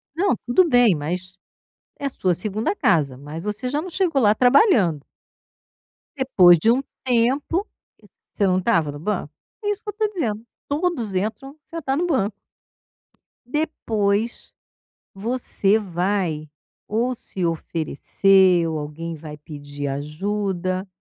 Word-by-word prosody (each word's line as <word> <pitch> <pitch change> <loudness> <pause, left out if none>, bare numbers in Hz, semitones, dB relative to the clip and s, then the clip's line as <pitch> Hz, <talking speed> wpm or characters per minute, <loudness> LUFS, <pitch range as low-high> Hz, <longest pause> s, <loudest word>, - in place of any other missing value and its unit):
Não, 370 -2 +2
tudo 295 +9 +4
bem 245 - +5
mas, 180 +5 -4 0.7
é 280 - -1
sua 185 -8 0
2ª 215 - +1
casa, 145 - +2
mas 150 +4 -8
você 210 +5 -3
já 290 +3 -1
não 370 - -7
chegou 340 -6 +1
lá 210 -2 +4
trabalhando. 245 - +4 1.1
Depois 190 -11 +6
de 220 +9 +3
um 255 +3 +2 0.2
tempo, 265 - +1 0.6
você 205 - 0
não 185 0 +2
estava 165 -4 +1
no 145 - -9
banco? 175 -3 -3 0.3
É 415 - 0
isso 415 0 -4
que 420 - -6
eu - - -1
estou 430 +1 0
dizendo, 230 - -2 0.2
todos 285 - -1
entram, 220 +9 -3
senta 300 -5 -3
no 340 +5 0
banco. 220 - +1 1.1
Depois, 230 -7 -1 0.6
você 215 -1 0
vai 175 -5 -2 0.4
ou 235 +4 0
se 190 -5 -4
oferecer 170 +3 +2
ou 160 -1 -2
alguém 155 +3 -6
vai 150 -1 -9
pedir 145 -1 -7
ajuda, 185 +6 -2
205 Hz, 130 wpm, -22 LUFS, 170-260 Hz, 1.1 s, Depois